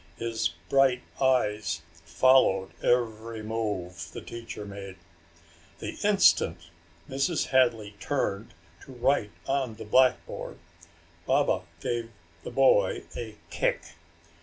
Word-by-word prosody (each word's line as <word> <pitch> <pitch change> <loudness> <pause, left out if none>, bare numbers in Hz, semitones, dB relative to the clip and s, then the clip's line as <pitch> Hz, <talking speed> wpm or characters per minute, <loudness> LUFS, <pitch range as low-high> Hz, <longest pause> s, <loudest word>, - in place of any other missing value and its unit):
His 115 -7 -1 0.2
bright 135 -2 +3 0.2
eyes 105 -9 +1
followed 95 +4 +3
every 115 -2 0
move 105 -5 -4
the - - -6
teacher 115 -3 -8
made. 100 -1 -8 0.8
The - - -5
instant 85 - +3 0.4
Mrs. 140 +5 0
Hadley 115 -6 +2
turned 110 -5 -2 0.3
to 135 - -12
write 125 -3 +1 0.2
on 135 -4 -1
the 110 - -9
blackboard 130 +4 +1 0.7
Baba - - +2 0.2
gave 120 -1 -2 0.3
the - - -7
boy 115 -8 +3
a 110 -2 -6 0.2
kick. - - +1
115 Hz, 105 wpm, -28 LUFS, 100-130 Hz, 0.8 s, bright